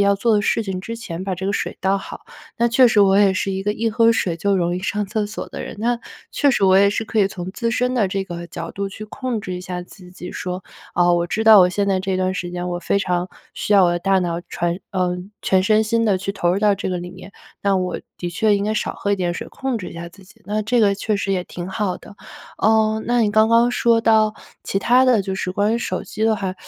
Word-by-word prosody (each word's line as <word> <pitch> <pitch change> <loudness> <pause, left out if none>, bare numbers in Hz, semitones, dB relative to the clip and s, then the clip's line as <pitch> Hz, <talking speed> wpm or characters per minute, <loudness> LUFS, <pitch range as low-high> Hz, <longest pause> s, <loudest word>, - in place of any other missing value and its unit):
要 200 0 +3
做 225 +3 +2
的 205 - +2
事 210 - +1
情 190 -2 -4
之 230 +4 -6
前 185 -6 -6
把 190 -2 -3
这 190 - -4
个 200 - 0
水 - - -3
倒 190 +1 +2
好。 - - -9 0.3
那 235 - +2
确 240 +2 +5
实 215 -2 +3
我 195 -1 +5
也 200 -1 +5
是 195 +1 -1
一 190 0 -3
个 210 - 0
一 225 +2 -1
喝 230 +1 +4
水 185 -7 0
就 200 +3 +1
容 175 -1 0
易 180 - -4
上 205 +1 -2
厕 210 +1 -1
所 210 +1 -6
的 - - -7
人， - - -8
那 235 +2 0 0.3
确 285 - +3
实 205 - +1
我 190 0 +5
也 200 +1 +5
是 215 +2 -2
可 220 0 0
以 195 - +3
从 180 -1 -6
自 230 +2 -2
身 250 +2 0
的 215 -6 +2
这 195 +1 -2
个 170 -1 -7
角 165 -1 -7
度 200 0 -3
去 210 +2 -9
控 240 +1 -4
制 185 -2 -5
一 180 - -5
下 180 0 -5
自 180 0 -15
己 180 0 -9
说： 180 0 -5 0.3
“哦， 175 0 +4
我 175 0 0
知 220 +5 -1
道 220 -2 +9
我 180 - +5
现 200 +2 -1
在 190 -1 +1
这 190 0 -1
段 185 0 0
时 175 -1 -4
间 180 0 -4
我 175 0 -3
非 200 - +1
常 180 -2 -1 0.3
需 - - -2
要 195 -2 +6
我 175 - +3
的 175 - -1
大 195 +1 +2
脑 170 -2 -2
船 175 +2 -2
呃， 180 -1 0 0.3
全 190 -1 +3
身 215 +2 +3
心 230 +1 +1
地 200 -4 +2
去 195 +1 -3
投 175 -3 0
入 190 - 0
到 205 -1 +3
这 190 -1 -4
个 180 - -2
里 175 0 -6
面， 190 +2 -12 0.3
那 200 -1 +2
我 185 -1 -2 0.2
的 175 - -3
确 210 +3 +2
应 200 - -2
该 215 +1 -1
少 - - -2
喝 200 - -2
一 - - +1
点 180 -2 -1
水、 - - -6
控 265 -3 -3
制 185 - -7
一 - - -11
下 170 0 -7
自 190 +3 -18
己。” 190 - -21
那 210 +3 -1
这 225 +3 +1
个 200 -2 +3
确 210 +1 -1
实 200 0 -2
也 180 -2 -1
挺 175 0 -7
好 195 -3 -2
的。 200 - -15 0.4
呃， 220 0 +2
那 240 0 +2
你 210 - +2
刚 220 +1 +4
刚 230 +1 +4
说 235 -1 +2
到 220 -1 +3 0.3
其 - - -3
他 250 +4 +4
的 245 -5 +3
就 190 0 -4
是 185 - -3
关 205 +3 +1
于 - - 0
手 - - -3
机 215 +1 -4
的 225 - +3
话， 190 -2 -3
200 Hz, 300 characters per minute, -21 LUFS, 185-220 Hz, 0.4 s, 道